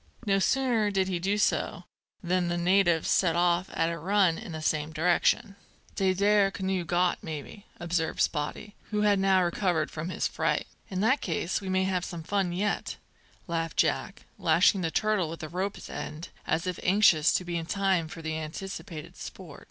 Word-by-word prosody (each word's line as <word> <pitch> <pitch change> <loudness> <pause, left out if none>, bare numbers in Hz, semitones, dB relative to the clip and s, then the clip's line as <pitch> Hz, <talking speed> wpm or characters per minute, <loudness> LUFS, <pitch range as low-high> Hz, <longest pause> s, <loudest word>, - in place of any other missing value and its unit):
No 195 -1 +2
sooner 240 -1 +2
did 190 -2 +1
he 180 -2 -1
do 195 +4 0
so 210 - 0 0.4
than 180 0 +1
the 175 0 -1
natives 175 -2 +3
set 170 -3 +3
off 175 +1 +2
at 165 +1 0
a 165 - -5
run 185 -1 +2
in 220 -4 -8
the 160 - -5
same 155 0 0
direction. 180 +6 +1 0.4
"Dey 190 -2 +2
there 200 +1 +3
canoe 190 -2 -2
got, 175 +2 +1
maybe," 160 +6 -7
observed 170 -2 -1
Spottie, 150 +7 -1 0.2
who 210 -1 0
had 205 -2 +3
now 190 -1 +4
recovered 175 -3 0
from 160 +2 -5
his - - -1
fright. - - -1 0.2
"In 190 -1 -2
that 255 +7 +3
case 170 +2 -1
we 190 - -5
may 185 0 +2
have 185 -2 0
some 170 -3 -6
fun 195 0 0
yet," 195 +3 -1 0.5
laughed 165 -2 -3
Jack, - - 0
lashing 170 +4 +4
the 165 - 0
turtle 210 -2 +1
with 165 +2 -7
the 155 - -6
rope's 190 +4 -4
end, 155 +3 -6 0.2
as 160 +2 0
if 180 -2 -3
anxious 180 -5 +4
to 180 - 0
be 175 0 -4
in 165 -1 -3
time 190 -4 +1
for 165 +1 -9
the 160 0 -2
anticipated 165 0 -7
sport. - - -9
180 Hz, 185 wpm, -28 LUFS, 165-195 Hz, 0.5 s, now